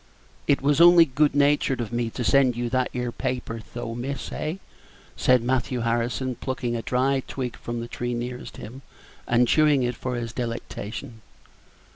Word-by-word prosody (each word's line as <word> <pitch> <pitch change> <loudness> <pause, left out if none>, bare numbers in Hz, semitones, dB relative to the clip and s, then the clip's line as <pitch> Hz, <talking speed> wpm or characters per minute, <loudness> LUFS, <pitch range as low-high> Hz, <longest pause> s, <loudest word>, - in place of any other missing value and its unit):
"It 140 -2 +2
was 145 +2 +3
only 175 -1 +9
good 145 +1 +1
natured 145 -2 +3
of 120 -1 -4
me 120 -1 0
to 125 - -4
send 130 0 +4
you 120 -1 -2
that 130 -1 +1
'ere 125 -1 -3
paper, 125 -3 -3
though, 115 -1 -4
miss, 130 +4 -5
eh?" 155 +2 -3 0.6
said 125 -1 +4
Mr. - - -6
Matthew 125 0 0
Harrison, 120 +3 -1
plucking 125 -1 -3
a 115 - -2
dry 130 +4 +1
twig 130 -2 -4
from 120 0 -5
the 115 - -5
tree 120 0 -3
nearest 125 +1 -6
him, 130 +5 -9 0.5
and 120 +1 +3
chewing 150 -3 +4
it 120 0 0
for 125 +1 -4
his 115 -1 -4
delectation. 115 -2 -5
125 Hz, 175 wpm, -25 LUFS, 120-135 Hz, 0.6 s, only